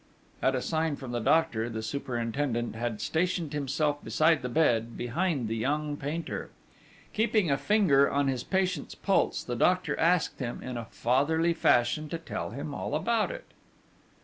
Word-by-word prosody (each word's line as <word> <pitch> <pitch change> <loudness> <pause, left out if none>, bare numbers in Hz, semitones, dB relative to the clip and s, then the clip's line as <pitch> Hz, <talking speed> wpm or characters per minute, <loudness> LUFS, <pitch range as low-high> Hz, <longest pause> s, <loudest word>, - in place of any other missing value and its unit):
At 130 - +2
a 125 - -2
sign 160 -2 0
from 130 -3 -8
the 120 - -1
doctor, 120 -3 +2
the 110 -1 -5
superintendent 120 0 -2
had 115 -1 -3
stationed 165 - -1
himself 145 +1 -1
beside 160 -2 +3
the 125 - -3
bed, 120 -5 +1
behind 140 +1 -1
the 110 - -2
young 145 +5 -1
painter. 150 +4 -4 0.6
Keeping 215 -6 +2
a - - +4
finger 180 -11 +4
on 140 0 +1
his 130 -2 -1
patient's 190 -1 -1
pulse, 195 - +1
the 120 - -4
doctor 180 +9 +2
asked 170 0 +2
him, 120 -3 -4
in 125 -1 -5
a 120 -1 -4
fatherly 155 +10 +1
fashion, 150 0 +2
to 165 - -3
tell 165 - -5
him 140 +1 -6
all 145 - -3
about 230 +8 +1
it. - - -7
145 Hz, 165 wpm, -29 LUFS, 120-165 Hz, 0.6 s, a